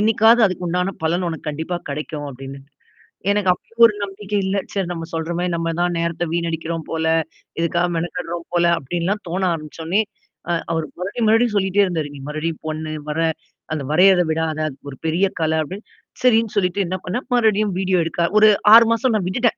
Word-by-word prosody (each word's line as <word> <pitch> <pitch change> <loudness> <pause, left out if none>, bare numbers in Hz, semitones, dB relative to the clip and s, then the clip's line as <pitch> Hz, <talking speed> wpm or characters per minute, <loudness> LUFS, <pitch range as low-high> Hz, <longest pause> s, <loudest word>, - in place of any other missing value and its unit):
என்னைக்காவது 225 +2 +5
அதுக்கு 180 -1 -4
உண்டான 180 +3 0
பலன் 175 +2 +1
உனக்கு 160 -2 -5
கண்டிப்பா 160 +4 -3
கிடைக்கும்." 150 0 -5
அப்படின்னு. 135 +1 -9 0.7
எனக்கு 200 -2 +1
அப்பவும் 230 +5 -9
ஒரு 220 - +4
நம்பிக்கை 200 +1 -4
இல்ல. 195 +1 0 0.2
சரி 195 -3 -1
நம்ம 165 -2 -4
சொல்றமாரி 170 +2 -2
நம்ம 165 0 -1
தான் 175 -1 +1
நேரத்த 170 +1 -1
வீணடிக்கிறோம் 165 -1 -2
போல, 160 0 -1 0.5
இதுக்காக 170 +1 +1
மெனக்கடுறோம் 170 0 -4
போல 175 0 +3
அப்படின்லாம் 175 +8 -2
தோண 180 +3 -2
ஆரம்பிச்சோனே, 165 +5 -2 0.5
அ - - +2 0.2
அவரு 160 -1 -1
மறுபடியும், 210 +5 -1
மறுபடியும் 225 0 +3
சொல்லிட்டே 195 +1 +3
இருந்தாரு. 160 -5 -2
"நீ - - -9
மறுபடியும் 155 +1 -3
பண்ணு 155 0 -4 0.2
வர 150 - -2 0.5
அந்த 150 - -3
வரையத 180 +3 +6
விடாதா 160 -1 -1
அது 135 - -12
ஒரு 135 - -11
பெரிய 170 +5 +2 0.2
கலை" 160 0 +1
அப்படின்னு. 190 +8 -9 0.4
சரின்னு 230 -3 +3
சொல்லிட்டு 195 +1 +1
என்ன 185 - -2
பண்ணேன் 220 +9 -3
மறுபடியும் 215 -4 +2
வீடியோ 190 -1 +1
எடுக்க 165 +1 -3 0.2
ஒரு 215 - +7 0.3
6 230 0 +10
மாசம் 235 +1 +1
நான் 190 -4 0
விட்டுட்டேன். 235 +5 +1
175 Hz, 175 wpm, -21 LUFS, 160-200 Hz, 0.7 s, 6